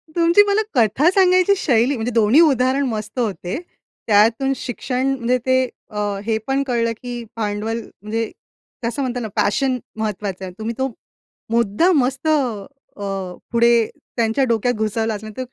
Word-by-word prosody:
तुमची 340 +4 +5
मला 405 +1 +3
कथा 245 +7 +4
सांगायची 370 0 +5
शैली, 255 -3 +2
म्हणजे 235 0 -2
दोन्ही 230 +4 +4
उदाहरण 270 -2 +3
मस्त 215 +1 -4
होते. 195 - -2 0.5
त्यातून 225 +6 +4
शिक्षण 255 +1 -3
म्हणजे 250 0 +1
ते 260 0 +3 0.3
अ, 210 - -9 0.3
हे 220 -1 +1
पण 270 +1 +1
कळलं 230 -2 +1
की 245 -1 -5
भांडवल 215 +1 -2 0.2
म्हणजे 225 +2 -3 0.5
कसं 235 +4 -2
म्हणतो 250 -2 -2
ना 230 - -4
पॅशन 255 +5 +1 0.2
महत्त्वाचं 205 -3 -3
आहे. 180 - -8
तुम्ही 225 +2 -3
तो 265 0 0 0.6
मुद्दा 235 - +3
मस्त 270 -1 +1
अ, - - +4 0.7
अ, 195 -3 -4 0.2
पुढे 235 -1 +4 0.3
त्यांच्या 230 +3 +1
डोक्यात 235 +2 +1
घुसवला 220 0 -1
असणार 215 +2 -8
235 Hz, 145 wpm, -20 LUFS, 215-265 Hz, 0.7 s, तुमची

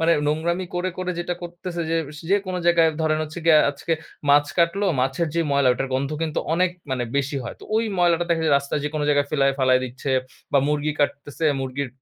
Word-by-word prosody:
মানে 165 +1 +4
নোংরামি 170 +5 0
করে 180 +1 -1
করে 185 0 -2
যেটা 175 +1 -2
করতেছে 175 0 -6
যে, 165 - +2 0.2
স - - -9
যেকোনো 195 -2 +1
জায়গায় 170 -1 +5
ধরেন 155 -1 +1
হচ্ছে 155 +2 -6
গিয়া 155 -2 +7
আজকে 145 +3 -4 0.4
মাছ 145 +1 +5
কাটলো, 175 +4 +2
মাছের 135 +6 0
যে 170 - +2
ময়লা 140 -2 +3
ওটার 135 +2 -3
গন্ধ 140 +2 -1
কিন্তু 160 -2 -1 0.2
অনেক 180 +1 +2 0.2
মানে 130 -2 -1
বেশি 140 +1 0
হয়। 120 - -6
তো - - -11
ওই 225 - +2
ময়লাটা 175 -1 +3
দেখা 165 -1 +2
যায়, 150 -3 +4
রাস্তায় 140 +1 -3
যে - - +1
কোন 155 - -1
জায়গায় 145 -1 +3
ফেলায় 135 -2 +2
ফালায় 130 -1 +4
দিচ্ছে, 130 +2 -5 0.4
বা 140 - +5
মুরগি 150 0 0
কাটতেছে 145 +2 -1 0.2
মুরগির 130 +1 -3
155 Hz, 210 wpm, -23 LUFS, 140-170 Hz, 0.4 s, গিয়া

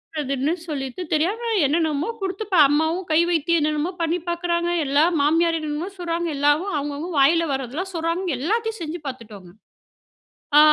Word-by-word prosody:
பண்ணறதுன்னு 280 0 -1 0.2
சொல்லிட்டு, 270 +1 -4
தெரியாம 415 +10 0
என்னென்னமோ 310 +3 0
குடுத்து 390 +3 -3
இப்ப 380 -3 +1
அம்மாவும் 320 +5 0
கை 310 - +5
வைத்தியம் 335 0 +2
என்னென்னமோ 305 +3 0
பண்ணி 335 +2 0
பார்க்கிறாங்க. 345 0 -1 0.2
எல்லா 285 +3 +3 0.2
மாமியார் 330 +3 +3
என்னென்னமோ 310 +4 -4
சொல்றாங்க. 340 0 -2
எல்லாவும் 290 +7 +2
அவுங்கவுங்க 290 +4 -4
வாயில 330 +5 +4
வரதெல்லாம் 275 +9 -4
சொல்றாங்க. 335 +3 -1
எல்லாத்தையும் 445 - -1
செஞ்சு 330 +1 -4
பார்த்துட்டோங்க. 215 -8 -9 1.1
ஆ - - +10
320 Hz, 140 wpm, -22 LUFS, 290-345 Hz, 1.1 s, ஆ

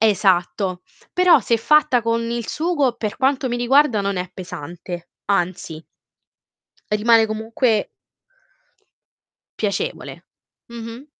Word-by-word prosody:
esatto. 190 -3 +1 0.3
Però 360 -4 +5
se 235 - +1
è - - +4
fatta 295 0 +3
con 230 0 0
il 235 -1 -3
sugo, 310 -6 0
per 215 -2 -4
quanto 265 0 +1
mi 240 - -2
riguarda 245 -1 +3
non 200 -1 -2
è 180 0 -3
pesante, 175 0 -8 0.2
anzi 175 -4 -2 1.1
rimane 225 +1 +4
comunque 220 +1 0 1.7
piacevole. 330 - -3 0.5
Mh-mh. 235 +3 -9
225 Hz, 105 wpm, -21 LUFS, 195-255 Hz, 1.7 s, Però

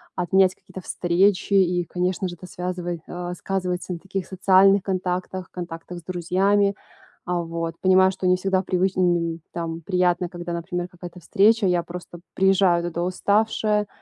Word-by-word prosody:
отменять 185 +1 +3
какие-то 190 - -11
встречи, 185 +4 +1
и 180 -2 +3
конечно 180 +2 -1
же 175 - -7
это 185 - -12
связывай 180 -1 -4
а, 175 0 -5
сказывается 180 -1 -3
на 170 - -6
таких 195 0 -5
социальных 195 +1 +4
контактах, 185 -1 -3
контактах 175 0 -7
с 170 - -18
друзьями. 190 +3 +1 0.5
А 180 -1 -1
вот, 165 0 -4
понимаю, 185 0 +5
что 185 0 -3
не 180 - +5
всегда 190 0 +1
привычн 185 0 0
нь 170 -2 +1
там 165 -1 -4
приятно, 180 0 +1
когда 175 -1 -6
например 175 +1 -3
какая-то 175 0 -10
встреча. 205 +4 +3
Я 175 -1 +1
просто 175 0 -9 0.2
приезжаю 190 -2 +3
туда 170 0 -3
уставшая. 210 +3 +1
180 Hz, 155 wpm, -23 LUFS, 175-190 Hz, 0.5 s, понимаю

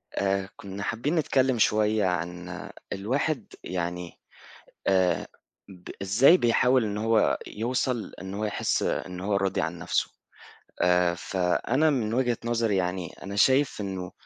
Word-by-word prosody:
آآ، 95 0 0
كنا 100 0 -7
حابين 140 +11 -1
نتكلَّم 130 -5 +2
شوية 105 -1 +3
عن 90 0 -3 0.2
الواحد 130 +9 -2
يعني 90 -1 -4 0.7
آآ، 95 -2 +2 0.4
ب 90 -2 -13
إزاي 120 - +6
بيحاول 125 -1 +3
إنه 105 0 -3
هو 115 -1 +3
يوصل، 120 +1 -2
إنه 95 +1 -6
هو 110 - -1
يحِس 105 - 0
إنه 90 0 -3
هو 100 0 +1
راضي 95 -3 0
عن 80 +2 -3
نفسه. - - -1 0.7
آآ، 90 -1 +3
فأنا 95 - +1
من 115 -6 0
وجهة 120 -1 +1
نظري 115 -3 +1
يعني، 90 -1 -2
أنا 100 +1 -6
شايف 130 +4 +3
إنه 95 -3 -4
100 Hz, 135 wpm, -27 LUFS, 90-120 Hz, 0.7 s, إزاي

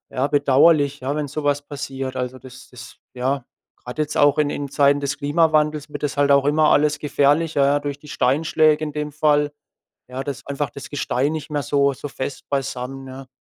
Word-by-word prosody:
ja, 130 +2 0
bedauerlich, 145 +1 +3
ja, 135 +2 -2
wenn 150 - -2
so 150 +2 -5
was 145 0 +1
passiert. 135 -2 -6
Also, 125 0 -4
das 130 0 -13
das, 125 0 -12 0.2
ja 130 +1 -1 0.3
grade 125 +5 -8
jetzt 150 0 -4
auch 145 0 +4
in 150 -1 +3
in 145 -1 -4
Zeiten 140 +1 +3
des 140 -1 -3
Klimawandels 150 0 +1
wird - - -7
das 145 - -2
halt 145 0 +2
auch 140 0 +4
immer 155 +1 +3
alles 150 0 +3
gefährlicher, 145 +1 +2
ja, 145 +1 +3
durch 145 -1 -5
die 150 - -15
Steinschläge 155 +4 +2
in 150 - -5
dem 150 0 -3
Fall. 150 0 +2 0.6
Ja, 130 +1 -5
da 145 - -2
ist 135 - -12
einfach 140 -1 -2
das 140 - -10
Gestein 145 0 -1
nicht 155 0 -5
mehr 145 -1 -2
so 140 +1 +2
so 145 - -7
fest 130 0 -6
beisammen, 135 -1 -3
ne? 130 0 -10
145 Hz, 205 wpm, -21 LUFS, 135-150 Hz, 0.6 s, auch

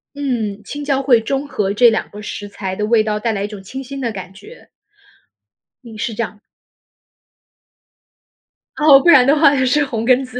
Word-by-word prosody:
嗯， 230 -8 -3
青 290 +7 -7
椒 275 -1 0
会 260 -4 +4
中 275 +5 -3
和 200 -7 -2
这 240 +3 +5
两 220 - -2
个 210 - -10
食 205 -1 -7
材 195 -2 -6
的 210 +2 -2
味 225 0 +3
道， 210 -1 -2
带 225 +1 -1
来 200 -2 -3
一 - - -2
种 205 -2 -10
清 265 +8 -8
新 275 +1 -8
的 235 -3 -2
感 190 -2 -8
觉。 425 - -16 1.1
嗯， 225 -3 -11
是 225 - -3
这 230 +2 -2
样。 215 -1 -8 2.4
哦， 300 -3 +6
不 275 - -2
然 260 -7 +7
的 280 +3 +4
话 290 -2 +5
也 260 -2 +1
是 285 +3 +2
红 230 -4 -4
根 255 +1 +3
子。 250 -1 -8
235 Hz, 215 characters per minute, -17 LUFS, 210-275 Hz, 2.4 s, 然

